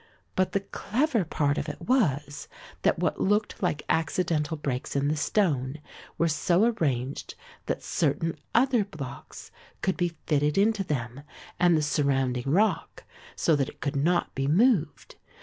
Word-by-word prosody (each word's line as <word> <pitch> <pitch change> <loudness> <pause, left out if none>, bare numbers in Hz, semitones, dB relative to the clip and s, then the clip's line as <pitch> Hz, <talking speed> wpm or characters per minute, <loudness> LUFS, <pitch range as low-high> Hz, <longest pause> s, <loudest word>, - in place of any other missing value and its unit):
But 185 0 +1
the 200 - +1
clever 235 +4 0
part 145 -3 0
of 150 - -4
it 150 - -7
was, 145 - 0 0.3
that - - +2
what - - -1
looked 210 +2 +1
like 175 -6 0
accidental 160 -1 0
breaks 135 -3 -3
in 140 +1 +1
the 155 - +1
stone 145 -5 0 0.4
were 170 - +2
so 170 +4 +2
arranged 140 - -1 0.3
that - - -2
certain 165 0 0 0.2
other 245 -2 +4
blocks 150 -11 -9 0.3
could 190 - +1
be 175 -1 -1
fitted 150 +1 +1
into 205 0 +3
them 130 -5 -3 0.4
and 175 -2 +5
the 155 - 0
surrounding 135 -4 0
rock 190 +3 +1 0.3
so 165 - +2
that 135 -2 0
it - - -15
could 140 0 -3
not 170 +5 +1
be 135 0 -1
moved. 170 - +2
160 Hz, 150 wpm, -27 LUFS, 140-195 Hz, 0.4 s, and